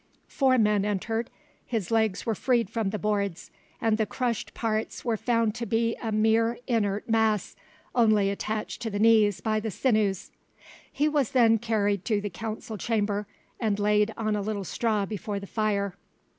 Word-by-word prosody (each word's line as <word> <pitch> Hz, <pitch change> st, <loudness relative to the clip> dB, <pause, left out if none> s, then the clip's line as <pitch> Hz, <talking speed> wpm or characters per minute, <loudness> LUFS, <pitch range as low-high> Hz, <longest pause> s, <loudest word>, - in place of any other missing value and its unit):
Four 260 Hz, -2 st, +2 dB
men 210 Hz, -3 st, +3 dB
entered, 225 Hz, +3 st, -2 dB, 0.3 s
his 220 Hz, -6 st, -3 dB
legs 220 Hz, -4 st, +1 dB
were 225 Hz, -, +1 dB
freed 235 Hz, -1 st, +1 dB
from 225 Hz, -3 st, -1 dB
the 215 Hz, -, -3 dB
boards, 200 Hz, -4 st, -2 dB, 0.3 s
and 225 Hz, -1 st, +1 dB
the 215 Hz, -, +1 dB
crushed 245 Hz, -4 st, -3 dB
parts 220 Hz, +1 st, -2 dB
were 235 Hz, -2 st, +1 dB
found 230 Hz, -1 st, +1 dB
to 235 Hz, +1 st, -5 dB
be 230 Hz, 0 st, +1 dB
a 225 Hz, -, -2 dB
mere 225 Hz, +2 st, +2 dB
inert 210 Hz, -4 st, 0 dB
mass, 220 Hz, -3 st, +1 dB, 0.4 s
only 215 Hz, -4 st, +3 dB
attached 215 Hz, +2 st, -4 dB
to 230 Hz, -, -2 dB
the 205 Hz, -, -3 dB
knees 215 Hz, -2 st, +4 dB
by 215 Hz, -1 st, 0 dB
the 220 Hz, +1 st, -3 dB
sinews. 210 Hz, -4 st, 0 dB, 0.6 s
He 295 Hz, -, +1 dB
was 295 Hz, -5 st, 0 dB
then 230 Hz, -3 st, +5 dB
carried 205 Hz, -4 st, 0 dB
to 215 Hz, -3 st, +1 dB
the 205 Hz, -1 st, -4 dB
council 220 Hz, +2 st, -6 dB
chamber, 205 Hz, -2 st, -1 dB, 0.3 s
and 215 Hz, -4 st, 0 dB
laid 210 Hz, +1 st, +2 dB
on 215 Hz, -1 st, 0 dB
a 205 Hz, -, -1 dB
little 205 Hz, -1 st, -3 dB
straw 210 Hz, +1 st, 0 dB
before 210 Hz, 0 st, -4 dB
the 200 Hz, -, -8 dB
fire. 200 Hz, -2 st, -1 dB
215 Hz, 170 wpm, -27 LUFS, 205-230 Hz, 0.6 s, then